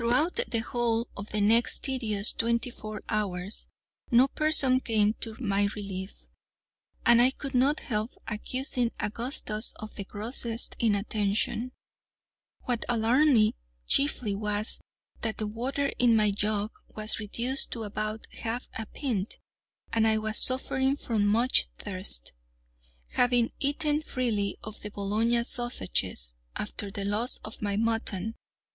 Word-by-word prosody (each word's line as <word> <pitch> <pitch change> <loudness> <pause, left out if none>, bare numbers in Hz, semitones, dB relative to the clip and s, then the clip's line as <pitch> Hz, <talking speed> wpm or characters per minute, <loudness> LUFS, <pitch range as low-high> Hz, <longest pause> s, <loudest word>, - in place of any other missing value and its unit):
Throughout 255 - +2
the 230 - -1
whole 235 -1 0
of 200 +1 -7
the 215 - -1
next 225 +3 +4
tedious 220 -6 +2
twenty 235 +1 0
four 215 -2 -8
hours 200 -2 -2 0.4
no 245 +3 +6
person 285 -4 +4
came 215 -4 +2
to 225 -2 -2
my 200 -4 +1
relief, 195 -2 -6 0.8
and 235 0 +7
I 250 - +6
could 275 +1 -6
not 270 +4 +3
help 215 -1 -2 0.2
accusing 245 +2 -1
Augustus 220 -1 -1
of 215 0 -9
the 200 - -5
grossest 225 +3 0
inattention. 215 +2 0 0.9
What 245 -2 -1
alarmed 245 +5 +4
me 215 0 +4 0.3
chiefly 250 - +2
was, 210 +1 -1 0.4
that 220 -2 -2
the 215 - -2
water 255 +6 -2
in 240 -2 +5
my 210 -1 +4
jug 210 +1 -1 0.2
was 215 +1 0
reduced 235 +5 -1
to 230 - -4
about 215 +1 -4
half 235 +2 -5
a 225 - -5
pint, 230 -8 -3 0.6
and 225 -1 +3
I 220 0 +4
was 215 0 +1
suffering 265 +1 +3 0.2
much 220 +5 +4
from - - -34
thirst, 185 - -2 0.8
having 245 -1 +3
eaten 295 +2 +2
freely 230 -9 -1
of 215 0 -8
the 210 - -4
Bologna 215 +4 +1
sausages 140 - -1 0.2
after 205 - -4
the 200 -1 -5
loss 215 +5 0
of 215 - -8
my 205 -1 -1
mutton. 225 -2 -1
225 Hz, 135 wpm, -28 LUFS, 210-245 Hz, 0.9 s, and